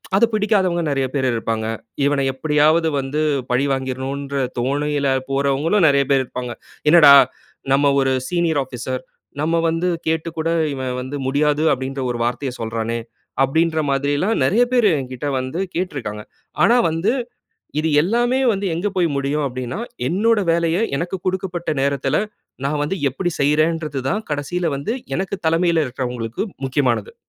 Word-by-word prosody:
அது 205 - +5
பிடிக்காதவங்க 195 -5 +2
நிறைய 135 -2 0
பேரு 135 -2 +1
இருப்பாங்க. 115 -1 -2 0.4
இவன 140 -1 +2
எப்பிடியாவது 155 +4 +2
வந்து 140 +3 -2 0.3
பழிவாங்கிர்ணுன்ற 135 +1 -2 0.2
தோணையில 140 +2 0 0.2
போறவங்களும் 140 +7 +2
நிறைய 140 -1 +4
பேர் 135 -1 +4
இருப்பாங்க. 125 -1 -6 0.4
"என்னடா! 150 -3 +9 0.6
நம்ம 140 +1 +4
ஒரு 135 0 +1 0.2
சீனியர் 170 -4 +1
ஆபீஸர் 130 0 -5 0.4
நம்ம 160 +3 +1
வந்து 165 +2 -1 0.2
கேட்டுக்கூட 160 0 -1 0.2
இவன் 130 -1 -3
வந்து 130 +3 -6
முடியாது 150 +2 +1
அப்பிடின்ற 135 +1 -4
ஒரு 120 - -4
வார்த்தைய 125 +3 -2
சொல்றானே!" 115 +1 -2 0.4
அப்பிடின்ற 160 +4 +1
மாதிரிலாம் 145 +10 +1
நிறைய 215 - +3
பேரு 235 -4 +5
எங்கிட்ட 130 +2 -5
வந்து 130 +7 -4 0.2
கேட்டிருக்காங்க. 135 - -3 0.4
ஆனா, 235 +6 +5
வந்து 165 +8 0 0.7
இது 160 - 0
எல்லாமே 240 - +1
வந்து 200 -1 -2
எங்க 175 +5 -1
போய் 175 -2 +3
முடியும் 140 +2 0
அப்பிடின்னா, 130 +3 -4 0.3
என்னோட 215 +5 +2
வேலைய 170 0 +1 0.2
எனக்கு 175 +5 -2
கொடுக்கப்பட்ட 180 -2 -2
நேரத்தில 140 -1 0 0.5
நான் 145 +1 0
வந்து 170 +6 -1
எப்பிடி 175 +7 -2
செய்றேன்றதுதான் 155 +4 0
கடைசில 150 +5 -2
வந்து 145 - -3 0.2
எனக்கு 190 +1 -2
தலைமையில 165 -1 +2
இருக்கிறவங்களுக்கு 120 -2 -4 0.2
முக்கியமானது. 125 -5 0
145 Hz, 130 wpm, -20 LUFS, 130-170 Hz, 0.7 s, என்னடா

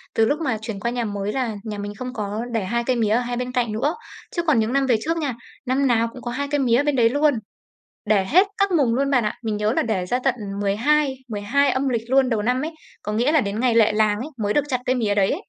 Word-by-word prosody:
từ 225 - +4
lúc 290 +6 0
mà 255 -8 0
chuyển 220 -3 -5
qua 235 +3 -2
nhà 240 -2 -2
mới 205 0 -3
là 245 -5 -2
nhà 210 -2 -5
mình 205 0 -5
không 250 +2 -6
có 210 0 -3
để 225 -4 -1
2 235 +5 -1
cây 255 - +1
mía 220 -3 +1
ở 225 +3 +3
hai 245 0 -3
bên 250 0 -3
cạnh 240 -3 0
nữa, 275 +9 0 0.4
chứ 340 - 0
còn 305 -8 +3
những 220 +3 0
năm 275 -1 +2
về 245 -3 +3
trước 330 +1 -1
nha, 285 -6 -1 0.3
năm 265 +2 +1
nào 230 -1 +2
cũng 255 - -11
có 240 - -4
2 285 +3 -3
cây 290 - +1
mía 250 +1 +3
bên 295 -2 +1
đấy 230 -2 +4
luôn, 290 +2 +3 0.7
để 200 -3 +2
hết 370 +7 +5
các 395 -1 +2
mùng 265 -9 +2
luôn 275 +1 +1
bạn 250 -4 +3
ạ. - - -1
Mình 215 -2 -1
nhớ 210 +2 +1
là - - +1
để 190 -6 -1
ra 250 +7 0
tận 265 -2 +2 0.3
12, 265 +8 +2
12 235 +7 +1
âm 265 +1 0
lịch 230 -1 -2
luôn 265 -1 +4
đầu 220 -3 0
năm 250 +4 0
ấy, 315 +2 -3 0.3
có 210 - -4
nghĩa 245 +7 +2
là 310 -4 +4
đến 205 +1 -3
ngày 245 -2 +2
lệ 220 -2 +5
làng 210 -1 +2
ấy 280 +6 -5
mới 205 - +1
được 295 - +2
chặt 255 -3 -1
cây 255 - +1
mía 210 -4 0
đấy 195 -1 +3
ấy. - - -3
240 Hz, 285 wpm, -22 LUFS, 215-270 Hz, 0.7 s, hết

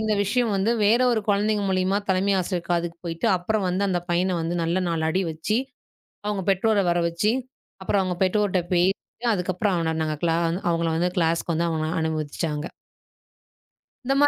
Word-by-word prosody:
இந்த 220 -1 +1
விஷியம் 230 +2 +1
வந்து, 195 +4 +1
வேற 225 +4 +4
ஒரு 220 - +1
குழந்தைங்க 205 +1 +2
மூலியமா 185 +1 +1
தலைமை 195 +1 +2
ஆசிரியர் 180 -1 -3
காதுக்கு 170 -1 -1
போயிட்டு, 165 +6 -2
அப்பறம் 195 +2 -1
வந்து 190 +3 0
அந்தப் 175 -1 -2
பையனை 180 +1 +1
வந்து 170 +2 -2
நல்ல 170 +3 0
4 165 -1 -1
அடி 185 +4 +1
வச்சு, 160 +8 -1 0.7
அவுங்க 205 -3 -1
பெற்றோரை 200 +1 +2
வர 175 - +1
வச்சு, 190 +6 +1 0.5
அப்பறம் 195 +1 +2
அவுங்க 180 -1 -2
பெற்றோர்ட்ட 190 -1 +1
பேசி, 180 +2 +4 0.4
அதுக்கப்பறம் 185 +2 0
அவன 160 -1 -1
நாங்க 155 -1 -2
கிளா 165 -1 +2 0.3
அவங்கள 165 -1 +1
வந்து 175 +2 +1
கிளாஸ்க்கு 165 0 +1
வந்து 170 +1 +1
அவன 155 -1 -1
அனுமதிச்சாங்க. 155 0 -2 1.4
இந்த 270 - +2
மா 290 - +7
180 Hz, 170 wpm, -24 LUFS, 165-200 Hz, 1.4 s, மா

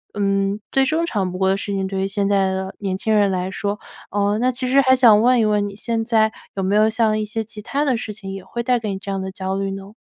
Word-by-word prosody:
嗯， 195 0 0
最 270 - +3
正 315 +5 +1
常 195 - -2
不 185 - -6
过 190 0 +2
的 195 - +3
事 200 0 -4
情， 195 -1 -1
对 190 0 -3
于 195 - 0
现 200 0 -1
在 195 -1 +2
的 190 0 -4
年 190 -2 -2
轻 220 +3 0
人 205 -2 +4
来 185 0 -2
说。 200 +2 -3 0.3
呃， 205 +1 +1
那 255 +1 +2
其 255 +1 -2
实 275 +2 +5
还 260 -1 +4
想 225 -5 +6
问 250 0 +4
一 220 - +3
问， 210 -1 +1
你 200 - -11
现 225 +1 -2
在 220 -1 +2 0.2
有 195 - -2
没 195 +2 +1
有 215 +1 +4
像 220 -1 +1
一 - - -1
些 220 +1 -3
其 210 -1 -10
他 285 +7 -1
的 260 -4 +2
事 220 - -4
情 195 -2 -7
也 195 -1 -7
会 235 - -5
带 245 0 +2
给 220 -2 -4
你 195 - -3
这 200 0 -6
样 195 -1 -2
的 190 0 -5
焦 190 0 -3
虑 195 0 -2
呢？ 195 +1 -8
205 Hz, 315 characters per minute, -21 LUFS, 195-225 Hz, 0.3 s, 想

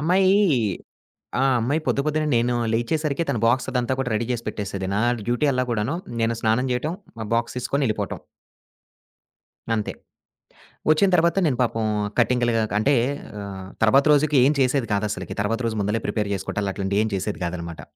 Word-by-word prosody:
అమ్మాయీ 185 +5 +4 1.0
ఆ - - +3 0.2
అమ్మాయి 135 +7 0
పొద్దు, 140 - +2
పొద్దునే 155 0 0
నేను 120 +1 +1 0.2
లేచేసరికే 145 +6 0
తన 135 - +1
బాక్స్ 130 +2 +2
అదంతా 125 0 0
కూడా 135 -2 -1
రెడీ 110 +2 -1
చేసి 115 -1 -3
పెట్టేసేది. 100 -3 -4
నా - - +1 0.3
డ్యూటీ 120 +5 +1
అల్లా 130 0 0
కూడాను 115 +7 -1 0.3
నేను 115 +1 +1
స్నానం 115 +4 +2
చేయటం, 150 +7 -2 0.2
మా 110 - -4
బాక్స్ 115 +1 0
తీసుకొని 140 +3 0
ఎళ్ళిపోటం. 110 - -2 1.6
అంతే. 110 -2 -2 1.0
వచ్చిన 155 +6 +4
తర్వాత 170 +1 +2
నేను 135 -6 +1
పాపం 115 -2 -1 0.3
కటింగ్లుగా 120 -1 +2 0.2
అంటే 140 +6 +3 0.5
ఆహ్, 95 -2 -7
తర్వాత 135 +6 +5
రోజుకి 150 0 +3
ఏం 140 - +5
చేసేది 130 -2 +1
కాదసలకి. 100 -3 -2
తర్వాత 115 +3 -1
రోజు 110 -1 -3
ముందలే 105 +3 -1
ప్రిపేర్ 105 -2 -1
చేసుకుంటాలు 100 +1 -3
అట్లాంటివి 100 +2 0
ఏం 110 - -1
చేసేది 95 +3 -3
కాదనమాట. 85 -1 -5
120 Hz, 155 wpm, -23 LUFS, 105-140 Hz, 1.6 s, తర్వాత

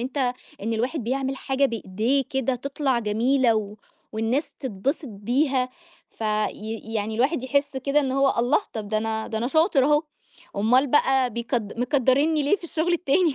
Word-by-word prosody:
أنت، 255 0 -1 0.3
إن 225 +2 -1
الواحد 245 +3 -2
بيعمل 265 +2 -1
حاجة 270 +1 0
بإيديه 230 +4 0
كده 265 -1 0
تطلع 275 0 -1
جميلة، 235 +3 +2
و 210 -1 -2 0.4
والناس 225 +7 -1
تتبسط 265 - -3
بيها، 250 +5 0 0.4
ف - - -27 0.3
ي 225 +1 -7
يعني 220 0 -1
الواحد 260 +4 +1
يحس 280 +1 0
كده 275 +3 +2
إن 265 -2 -1
هو 275 0 +3
الله! 245 +6 +3
طب 215 -3 -5
دا 215 0 +1
أنا 220 0 -2
دا 220 - -3
أنا 235 - -1
شاطر 315 -1 +3
أهو، 295 +1 +3 0.5
أومّال 250 +7 +3
بقى 265 -2 +3
بيكد 230 -1 -3
مكدرينني 280 +4 +2
ليه 295 +9 +3
في 345 - -14
الشغل 335 +1 -1
التاني؟ 335 -1 +2
260 Hz, 165 wpm, -24 LUFS, 225-280 Hz, 0.5 s, هو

